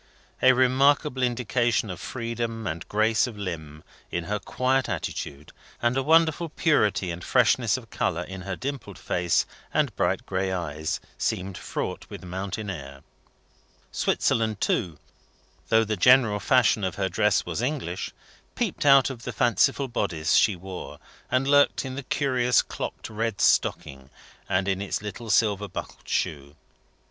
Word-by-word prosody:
A 130 0 +7
remarkable 130 +2 +3
indication 120 -2 +1
of 90 - -7
freedom 115 -1 -4
and 85 -2 -4
grace 110 +2 +2
of 115 -4 -8
limb, 80 -6 -6 0.3
in 85 - -2
her 105 +4 -2
quiet 130 +4 0
attitude, 70 +2 -5 0.3
and 120 +1 +1
a 135 - +2
wonderful 165 +2 +3
purity 105 - +1
and 85 +1 -7
freshness - - +3
of - - -12
colour 85 +2 -1
in 95 +1 -8
her 95 0 -4
dimpled 130 -6 -6
face 85 -2 +1 0.3
and - - 0
bright - - 0
gray 95 0 -1
eyes, 80 -4 -3 0.2
seemed 95 +1 -2
fraught - - -5
with - - -9
mountain 95 +4 -5
air. 70 -5 -9 0.9
Switzerland 110 -2 0
too, 85 -5 0 0.7
though 110 0 +5
the 110 0 -1
general 120 -1 +5
fashion 120 -3 +3
of 95 -2 -1
her 95 -1 0
dress 105 +2 +1
was 90 +4 -3
English, 125 - -2 0.5
peeped - - -1
out 135 -1 +6
of 120 -3 -9
the 125 - -5
fanciful 120 +4 +2
bodice 90 -10 -1
she 105 - +4
wore, 90 +1 -8 0.3
and 130 +1 +1
lurked 145 0 +4
in 130 - -5
the 140 - -4
curious 125 -3 +2
clocked - - -6
red 110 -1 -3
stocking, 65 -1 +1 0.4
and 95 0 +1
in 95 0 0
its 100 +1 -3
little 105 +3 -7
silver 105 -2 +2
buckled 95 - -8
shoe. 70 -1 -2
105 Hz, 150 wpm, -26 LUFS, 90-125 Hz, 0.9 s, A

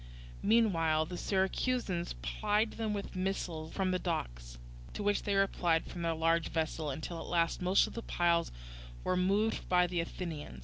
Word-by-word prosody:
Meanwhile 165 -8 +3
the 180 - -6
Syracusans 190 - 0
plied 205 - +1
them 220 -2 -2
with 200 -1 -5
missiles 180 -4 -2
from 190 -2 0
the 185 - +1
docks, - - -4 0.4
to - - -4
which 205 0 +2
they 200 - -1
replied 175 -4 +2
from 175 - -7
their 165 -1 0
large 165 +1 +2
vessel; 160 -1 -1
until 160 +4 -4
at - - -7
last 170 0 +1
most 185 +2 +4
of - - -8
the 230 - -4
piles 170 -5 +1 0.5
were - - 0
removed 195 +4 +1
by 180 0 +5
the 175 0 -2
Athenians. 165 - -5
175 Hz, 170 wpm, -33 LUFS, 165-195 Hz, 0.5 s, by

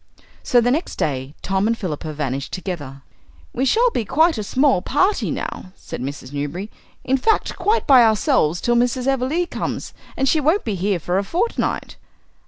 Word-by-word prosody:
So 245 - +3
the 245 +1 +2
next 310 +7 -1
day 135 0 -2
Tom 195 +2 +1
and 230 0 +1
Philippa 160 -6 -4
vanished 140 -2 -3
together. 145 -8 -6 0.5
"We 260 - 0
shall 470 - +3
be 240 - -1
quite 315 - +3
a - - -2
small 260 -1 +2
party 375 - +1
now," 185 - -5
said - - -8
Mrs. 135 0 -6
Newberry; 145 +9 -4 0.3
"in 265 +1 +1
fact, 435 - +1
quite 415 +5 +1
by 265 -3 +7
ourselves 215 - +2
till 240 - +1
Mrs. 245 +1 +1
Everleigh 270 +6 +1
comes, - - -4 0.2
and 270 - +1
she 315 - +3
won't 315 +8 +2
be 220 - -1
here 195 +1 0
for 175 +3 -1
a - - -1
fortnight." 370 - -2
230 Hz, 180 wpm, -21 LUFS, 170-280 Hz, 0.5 s, by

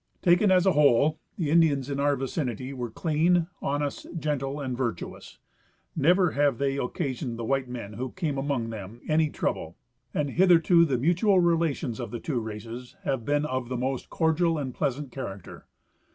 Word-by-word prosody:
Taken 175 +3 +5
as 185 -1 +4
a 190 - +5
whole, 150 0 +4 0.2
the 155 -5 -1
Indians 155 -5 +3
in 140 -1 -3
our 145 0 +2
vicinity 130 -1 -3
were 125 -3 -4
clean, 165 +6 +2 0.2
honest, 145 0 -2
gentle 145 -2 -2
and 130 -3 -3
virtuous. 120 -8 -5 0.6
Never 175 +3 +4
have 145 -3 +2
they 135 +1 0
occasioned 130 -3 -3
the 115 - -5
white 135 +1 0
men 115 -4 -6
who 125 +5 -4
came 155 -6 -3
among 135 -5 -1
them 110 +2 -8
any 155 0 +3
trouble, - - -3 0.3
and 145 -2 -1
hitherto 170 -1 +5
the 135 -5 0
mutual 180 - +3
relations 165 -7 +1
of 120 - -4
the 120 - -5
two 135 -2 -2
races 115 +3 -7
have 130 -4 -2
been 145 +1 +1
of 130 -3 -3
the 125 - -2
most 130 +1 -3
cordial 165 0 +1
and 135 -4 -3
pleasant 135 +2 -2
character. 100 -9 -8
140 Hz, 170 wpm, -27 LUFS, 125-160 Hz, 0.6 s, Taken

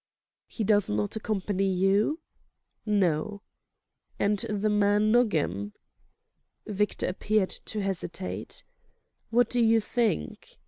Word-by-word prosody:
"He 225 - -4
does 205 -1 +3
not 105 0 -1
accompany 195 -2 -1
you?" 200 - +2 0.7
"No." 200 0 0 0.7
"And 205 0 +1
the 210 +1 -1
man 210 0 +3
Nogam?" 150 - +1 0.9
Victor 210 -1 -1
appeared 195 +1 0
to 215 - -3
hesitate. 190 -1 -4 0.7
"What 240 0 +3
do 245 0 0
you 225 0 +5
think?" 215 - -2
205 Hz, 100 wpm, -27 LUFS, 190-215 Hz, 0.9 s, you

